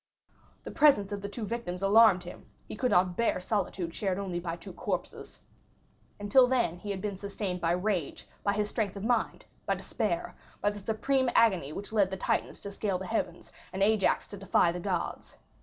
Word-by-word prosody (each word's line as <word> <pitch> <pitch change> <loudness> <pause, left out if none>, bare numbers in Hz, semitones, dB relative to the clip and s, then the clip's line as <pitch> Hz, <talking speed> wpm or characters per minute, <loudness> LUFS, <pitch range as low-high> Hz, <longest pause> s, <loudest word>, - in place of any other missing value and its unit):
The - - -7
presence 215 -10 +4
of 200 -1 -4
the 200 - -5
two 215 +2 -5
victims 195 -5 -4
alarmed 200 -2 +6
him; 175 - -11 0.2
he - - -6
could 250 +3 0
not 180 -3 +3
bear 235 -3 +1
solitude 180 -3 -2
shared 190 -1 -1
only 190 -3 -3
by 170 -1 -4
two 170 - -10
corpses. - - -5 0.8
Until 225 +5 +5
then 235 -9 +1
he 205 - -7
had 195 -2 -3
been 205 -2 -3
sustained 195 -2 -4
by 165 0 +2
rage, 180 -4 -2 0.2
by 200 - +2
his 210 0 0
strength 210 -3 -2
of 200 +1 -5
mind, 240 -1 0 0.2
by - - +2
despair, - - -3 0.2
by 205 - +1
the 205 - -8
supreme 255 +5 0
agony 190 -11 +3
which 205 +6 -7
led 200 -3 +3
the 190 - -4
Titans - - -1
to 200 - -6
scale 200 -2 -1
the 190 - -6
heavens, 180 -5 -3 0.2
and 195 +1 0
Ajax 215 -1 +2
to 200 - -8
defy 185 -3 +2
the 175 - -5
gods. 180 -1 -3
200 Hz, 195 wpm, -29 LUFS, 180-215 Hz, 0.8 s, alarmed